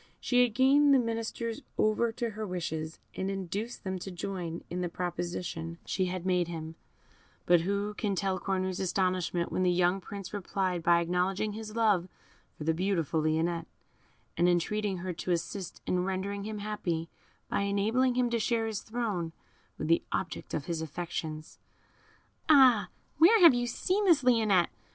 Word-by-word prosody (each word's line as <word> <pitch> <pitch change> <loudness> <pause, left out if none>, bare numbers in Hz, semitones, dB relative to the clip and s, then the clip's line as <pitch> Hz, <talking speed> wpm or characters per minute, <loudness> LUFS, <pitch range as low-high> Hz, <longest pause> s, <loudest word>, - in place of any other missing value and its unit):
She 245 -1 +3
had 240 -3 +2
gained 280 +2 +5
the - - +7
ministers 230 -1 -2 0.2
over 215 +2 +2
to 235 0 -2
her 215 +1 -5
wishes, 160 -4 -4 0.2
and 190 - -3
induced 195 +5 -4
them 190 -1 -3
to 195 - -6
join 175 -2 -5
in 180 +1 -4
the 175 - -1
proposition 170 -1 -4
she 190 - 0
had 180 0 -4
made 180 -2 +2
to 170 - -6
him; 160 0 -6 0.7
but 175 -1 +5
who 200 +3 -1
can 205 -2 -1
tell 190 0 -1
Cornue's 185 -1 -1
astonishment 185 -2 0
when - - -1
the 180 - +3
young 180 +2 +2
Prince 200 +1 -8
replied 190 -3 -1
by 170 +1 +4
acknowledging 180 +4 0
his 215 0 -7
love 210 -6 +3 0.5
for - - -6
the 160 +1 +2
beautiful 170 -3 0
Lionette, 160 +2 0 0.7
and 175 +1 +4
entreating 195 +3 0
her 180 +1 -4
to 175 - -6
assist 180 +2 -4
in 180 0 +1
rendering 195 +2 -3
him 215 0 -4
happy, 190 -6 -3 0.4
by - - 0
enabling 220 +6 +1
him 245 -1 +1
to 235 - +1
share 225 0 +1
his 220 -2 -3
throne 210 -8 -3 0.4
with 155 - -3
the 165 +1 +4
object 170 - -3
of 145 - -3
his 165 -2 -2
affections! 160 -1 -5 0.9
"Ah! 260 -8 +6 0.3
where 395 +8 +7
have 340 -6 +9
you 245 0 0
seen 380 - 0
this 330 -7 +5
Lionette?" 220 -8 +3
190 Hz, 170 wpm, -30 LUFS, 175-220 Hz, 0.9 s, have